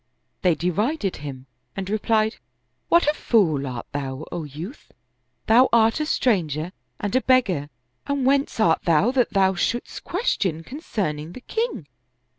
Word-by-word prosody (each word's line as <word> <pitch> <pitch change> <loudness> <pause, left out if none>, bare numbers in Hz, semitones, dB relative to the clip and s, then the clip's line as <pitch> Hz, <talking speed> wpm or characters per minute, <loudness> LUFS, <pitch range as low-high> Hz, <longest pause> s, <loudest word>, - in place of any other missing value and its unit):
They 180 -3 +3
derided 200 - -1
him 135 -3 -8 0.3
and 195 -1 -4
replied, 215 +1 +1 0.3
" - - -49
What 340 +1 +5
a 295 - +4
fool 165 - +2
art 125 -2 -5
thou, 140 +1 -4
O 170 -3 -4
youth 160 - -9
I - - -26 0.5
Thou 245 +4 +6
art 225 +3 +4
a 305 - -1
stranger 170 - 0 0.3
and 205 +3 -2
a 260 - +4
beggar, 195 - +2 0.4
and 280 -2 0
whence 275 -2 +2
art 165 -6 +3
thou 170 +8 +4
that 255 -2 +2
thou 190 -1 +4
shouldst 235 +6 -2
question 190 - -1
concerning 175 - -4
the 255 - -10
king?" 445 - -3
200 Hz, 155 wpm, -23 LUFS, 155-255 Hz, 0.5 s, Thou